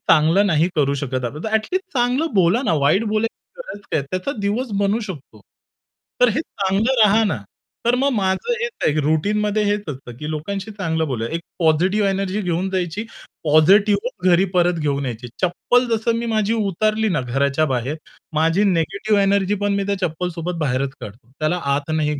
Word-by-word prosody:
चांगलं 165 Hz, +6 st, +4 dB
नाही 165 Hz, -1 st, +2 dB
करू 140 Hz, -2 st, +2 dB
शकत 130 Hz, -2 st, -3 dB
आता, 120 Hz, -, -1 dB
तर -, -, -1 dB
ॲट 220 Hz, 0 st, +1 dB
लिस्ट 375 Hz, 0 st, -2 dB
चांगलं 255 Hz, +6 st, +1 dB
बोला 190 Hz, +5 st, +3 dB
ना 195 Hz, -, +1 dB
वाईट 185 Hz, +10 st, +3 dB
बोलायची 220 Hz, -, -3 dB
गरज 205 Hz, -, -8 dB
काय? 155 Hz, -3 st, +1 dB
त्याचा 185 Hz, -, -3 dB
दिवस 215 Hz, +5 st, -1 dB
बनू 205 Hz, +3 st, +1 dB
शकतो. 140 Hz, -, -9 dB, 0.8 s
तर 250 Hz, -, +6 dB
हे 300 Hz, -, +1 dB
चांगलं 205 Hz, -1 st, 0 dB
रहा 215 Hz, +2 st, +4 dB
ना. 200 Hz, -, 0 dB, 0.5 s
तर 240 Hz, -, +4 dB
मग 275 Hz, +2 st, +2 dB
माझं 205 Hz, -, 0 dB
हेच 475 Hz, -, -1 dB, 0.2 s
आहे 155 Hz, 0 st, +1 dB
रुटीनमध्ये 205 Hz, +8 st, +1 dB
हेच 205 Hz, 0 st, 0 dB
असतं, 130 Hz, -3 st, -7 dB
की 150 Hz, +2 st, -5 dB
लोकांशी 195 Hz, +7 st, -4 dB
चांगलं 165 Hz, -6 st, -2 dB
बोला 115 Hz, -3 st, -2 dB
एक -, -, -6 dB, 0.2 s
पॉझिटिव्ह 185 Hz, +6 st, +2 dB
एनर्जी 195 Hz, +1 st, -1 dB
घेऊन 180 Hz, +1 st, -1 dB
जायची. 185 Hz, +2 st, -2 dB, 0.4 s
पॉझिटिव्हच 200 Hz, -, +3 dB
घरी 175 Hz, +2 st, +5 dB
परत 175 Hz, 0 st, +3 dB
घेऊन 140 Hz, -2 st, -1 dB
यायची. 120 Hz, 0 st, -5 dB
चप्पल 245 Hz, +8 st, +2 dB
जसं 230 Hz, +1 st, 0 dB
मी 235 Hz, -, -3 dB
माझी 220 Hz, -1 st, +1 dB
उतारली 215 Hz, +1 st, 0 dB
ना 170 Hz, -, 0 dB
घराच्या 140 Hz, +4 st, 0 dB
बाहेर, 130 Hz, +5 st, -2 dB, 0.4 s
माझी 165 Hz, +6 st, +2 dB
निगेटिव्ह 200 Hz, +3 st, +1 dB
एनर्जी 195 Hz, 0 st, +2 dB
पण 205 Hz, 0 st, +1 dB
मी 200 Hz, 0 st, 0 dB
त्या 200 Hz, -1 st, -1 dB
चप्पलसोबत 170 Hz, +1 st, -4 dB
बाहेरच 135 Hz, -2 st, -1 dB
काढतो. 115 Hz, +4 st, -11 dB
त्याला 155 Hz, +3 st, 0 dB
आत 145 Hz, +2 st, -3 dB
नाही 150 Hz, -1 st, 0 dB
घे -, -, -5 dB
190 Hz, 180 wpm, -21 LUFS, 155-210 Hz, 0.8 s, तर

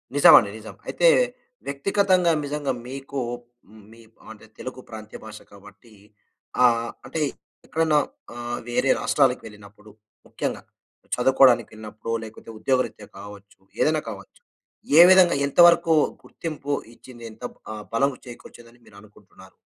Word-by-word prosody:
నిజమండి. 120 Hz, -7 st, +7 dB
నిజం. 110 Hz, 0 st, -11 dB
అయితే, -, -, +2 dB, 0.6 s
వ్యక్తిగతంగా 185 Hz, +4 st, +1 dB
నిజంగా 145 Hz, -1 st, -3 dB
మీకు, 135 Hz, +1 st, -6 dB, 0.7 s
మీ 115 Hz, +1 st, -16 dB, 0.3 s
అంటే, 110 Hz, 0 st, -14 dB
తెలుగు 130 Hz, 0 st, -7 dB
ప్రాంతీయ 110 Hz, -1 st, -10 dB
భాష 110 Hz, 0 st, -10 dB
కాబట్టి, 100 Hz, +3 st, -17 dB, 0.7 s
ఆహ్, 115 Hz, -1 st, +2 dB
అంటే, 135 Hz, +4 st, -5 dB, 0.5 s
ఎక్కడన్నా 160 Hz, -2 st, +1 dB, 0.4 s
ఆహ్, 120 Hz, 0 st, -5 dB
వేరే 125 Hz, +2 st, +1 dB
రాష్ట్రాలకి 135 Hz, -3 st, +2 dB
వెళ్ళినప్పుడు, 105 Hz, 0 st, -16 dB, 0.4 s
ముఖ్యంగా -, -, -4 dB, 0.5 s
చదువుకోడానికెళ్ళినప్పుడో, 115 Hz, -4 st, +1 dB
లేకోతే 110 Hz, +1 st, -12 dB
ఉద్యోగరీత్యా 130 Hz, +1 st, -1 dB
కావచ్చు, 100 Hz, -1 st, -13 dB, 0.2 s
ఏదైనా 155 Hz, 0 st, +2 dB
కావచ్చు. 100 Hz, -3 st, -11 dB, 0.6 s
ఏ -, -, +12 dB
విధంగా 185 Hz, -4 st, +6 dB
ఎంత 140 Hz, -, -7 dB
వరకూ 170 Hz, -1 st, +3 dB, 0.3 s
గుర్తింపు 150 Hz, -3 st, -7 dB, 0.2 s
ఇచ్చింది. 120 Hz, 0 st, -15 dB
ఎంతబ్ 110 Hz, +3 st, -9 dB, 0.2 s
ఆహ్, 105 Hz, -1 st, -8 dB
బలం 140 Hz, +3 st, +2 dB
చేకూర్చిందని 120 Hz, -1 st, -14 dB
మీరు 100 Hz, -, -18 dB
అనుకుంటున్నారు? 100 Hz, -2 st, -19 dB
120 Hz, 115 wpm, -23 LUFS, 110-140 Hz, 0.7 s, ఏ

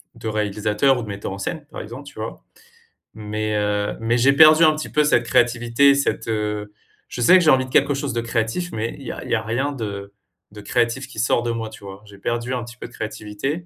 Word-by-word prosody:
de 115 Hz, -1 st, -7 dB
réalisateur 105 Hz, +4 st, +1 dB
ou -, -, -4 dB
de -, -, -8 dB
metteur 100 Hz, -1 st, -5 dB
en 95 Hz, -, -6 dB
scène, 155 Hz, -, -4 dB
par -, -, -6 dB
exemple, 120 Hz, +6 st, -9 dB
tu 135 Hz, -6 st, -12 dB
vois? 110 Hz, -, -6 dB, 0.7 s
Mais, 110 Hz, 0 st, -3 dB
heu, 105 Hz, 0 st, -1 dB
mais, 115 Hz, +2 st, +1 dB
j'ai 135 Hz, +3 st, +4 dB
perdu 155 Hz, +2 st, +7 dB
un 155 Hz, -1 st, +5 dB
petit 155 Hz, -, -5 dB
peu 150 Hz, -, +2 dB
cette 120 Hz, -5 st, +2 dB
créativité, 120 Hz, +3 st, +3 dB
cette, 140 Hz, -4 st, -1 dB
heu 105 Hz, -1 st, -2 dB, 0.4 s
je 125 Hz, -, -5 dB
sais 120 Hz, +10 st, +7 dB
que -, -, +3 dB
j'ai 155 Hz, -, +6 dB
envie 130 Hz, 0 st, +3 dB
de -, -, -12 dB
quelque 145 Hz, -, +3 dB
chose 140 Hz, -2 st, -3 dB
de 120 Hz, -, -1 dB
créatif, 115 Hz, +10 st, -2 dB
mais 115 Hz, -4 st, -3 dB
il 135 Hz, -, -11 dB
y -, -, -4 dB
a -, -, -7 dB
il -, -, -9 dB
y -, -, +4 dB
a 110 Hz, -, -1 dB
rien 125 Hz, +6 st, -1 dB
de 100 Hz, -6 st, -6 dB, 0.4 s
de 105 Hz, 0 st, -11 dB
créatif 120 Hz, +4 st, 0 dB
qui 125 Hz, -, -9 dB
sort 120 Hz, +1 st, +2 dB
de 120 Hz, -, -1 dB
moi, 115 Hz, -1 st, -4 dB
tu 110 Hz, -, -14 dB
vois? 95 Hz, 0 st, -9 dB
J'ai 100 Hz, -1 st, -14 dB
perdu 120 Hz, +4 st, -3 dB
un 125 Hz, -2 st, -2 dB
petit 120 Hz, 0 st, -11 dB
peu -, -, -7 dB
de 120 Hz, -, -19 dB
créativité. 110 Hz, +10 st, -5 dB
115 Hz, 250 wpm, -22 LUFS, 105-135 Hz, 0.7 s, perdu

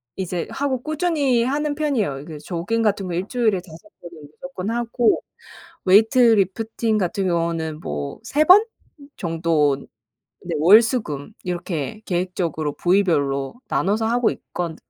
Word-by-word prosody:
이제 180 Hz, -2 st, -3 dB
하고 265 Hz, -3 st, -2 dB
꾸준히 300 Hz, -6 st, +1 dB
하는 290 Hz, +3 st, -1 dB
편이에요. 220 Hz, -, -1 dB
그 155 Hz, -2 st, -9 dB
조깅 190 Hz, +8 st, -2 dB
같은 200 Hz, -3 st, 0 dB
거 175 Hz, -, -4 dB
1 185 Hz, +3 st, -2 dB
주일에 225 Hz, -6 st, +1 dB
5 165 Hz, -2 st, -13 dB, 0.2 s
번은 165 Hz, -4 st, -11 dB
무조건 220 Hz, -3 st, -6 dB
하고 235 Hz, 0 st, +1 dB, 0.6 s
weight 220 Hz, +6 st, +5 dB
lifting 220 Hz, 0 st, +2 dB
같은 190 Hz, +1 st, -1 dB
경우는 165 Hz, -2 st, -1 dB
뭐 75 Hz, -1 st, -5 dB
3 295 Hz, +6 st, +2 dB
번? 390 Hz, +5 st, +8 dB, 0.5 s
정도. 165 Hz, -, +1 dB, 0.7 s
네. 175 Hz, -, -3 dB
월, 205 Hz, +8 st, +8 dB
수, 230 Hz, 0 st, 0 dB
금 145 Hz, +6 st, -7 dB
이렇게 175 Hz, +2 st, -4 dB
계획적으로 175 Hz, -4 st, -2 dB
부위별로 150 Hz, -7 st, +1 dB
나눠서 215 Hz, +3 st, 0 dB
하고 240 Hz, 0 st, +2 dB
있건 170 Hz, -2 st, -5 dB
190 Hz, 300 characters per minute, -22 LUFS, 165-235 Hz, 0.7 s, 번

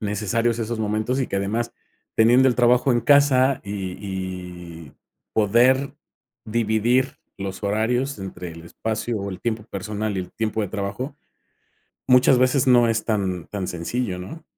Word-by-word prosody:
necesarios 110 Hz, +3 st, 0 dB
esos 115 Hz, 0 st, -3 dB
momentos 110 Hz, +5 st, -1 dB
y 130 Hz, -, 0 dB
que 100 Hz, -, -3 dB
además, 115 Hz, +5 st, -1 dB, 0.4 s
teniendo 120 Hz, +4 st, +6 dB
el 125 Hz, -, +1 dB
trabajo 125 Hz, +2 st, +3 dB
en 120 Hz, -1 st, +3 dB
casa 140 Hz, -1 st, +4 dB
y 95 Hz, -2 st, -5 dB
y 90 Hz, -5 st, -7 dB, 0.4 s
poder 125 Hz, +6 st, +3 dB, 0.5 s
dividir 115 Hz, +4 st, +1 dB, 0.2 s
los 95 Hz, +1 st, -6 dB
horarios 120 Hz, +6 st, 0 dB
entre 90 Hz, -3 st, -7 dB
el 80 Hz, 0 st, -11 dB
espacio, 110 Hz, +2 st, -3 dB
el 95 Hz, -, -7 dB
tiempo 110 Hz, -2 st, -1 dB
personal 105 Hz, -1 st, -4 dB
y 95 Hz, -, 0 dB
el 90 Hz, -, -8 dB
tiempo 110 Hz, -1 st, -2 dB
de 100 Hz, -, -3 dB
trabajo, 105 Hz, +9 st, -4 dB, 0.9 s
muchas 125 Hz, 0 st, +5 dB
veces 130 Hz, +1 st, +3 dB
no 120 Hz, -2 st, +5 dB
es 110 Hz, -1 st, -1 dB
tan 95 Hz, -6 st, -1 dB
tan 95 Hz, -3 st, -4 dB
sencillo, 90 Hz, +3 st, -3 dB
¿no? 155 Hz, -, -9 dB
110 Hz, 150 wpm, -23 LUFS, 100-125 Hz, 0.9 s, teniendo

